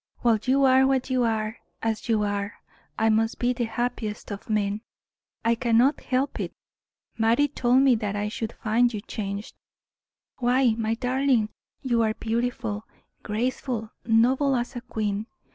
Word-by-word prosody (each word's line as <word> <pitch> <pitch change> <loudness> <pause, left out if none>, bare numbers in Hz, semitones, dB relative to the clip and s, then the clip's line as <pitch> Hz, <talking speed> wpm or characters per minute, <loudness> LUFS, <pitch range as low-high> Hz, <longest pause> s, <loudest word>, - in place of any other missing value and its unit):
"While 230 -3 +3
you 270 +2 +3
are 265 0 +6
what 265 -1 0
you 255 -1 +2
are, 220 -1 -1 0.2
and 225 - +2
as 220 +2 -7
you 215 -2 +3
are, 205 0 -2 0.4
I 220 0 +3
must 225 +1 +2
be 245 +1 +1
the 240 -1 -1
happiest 225 -3 -3
of 200 +2 -7
men 210 -1 0 0.6
I 230 - +4
cannot 240 +4 +3
help 265 +1 -1
it. - - -3 0.7
Mattie 230 +6 +4
told 260 -2 +3
me 270 -2 +6
that 210 -3 -1
I 205 0 -1
should 225 +1 -4
find 235 +2 +2
you 210 -3 -4
changed. 200 -1 -5 0.9
Why, 250 -1 +3
my 225 0 0
darling, 250 -2 +1 0.3
you 240 -3 +2
are 220 -1 +1
beautiful, 225 -2 -2 0.3
graceful, 230 0 -2
noble 255 +5 +3
as 245 +1 -2
a 245 - -4
queen. 215 -3 -3
230 Hz, 160 wpm, -26 LUFS, 215-250 Hz, 0.9 s, are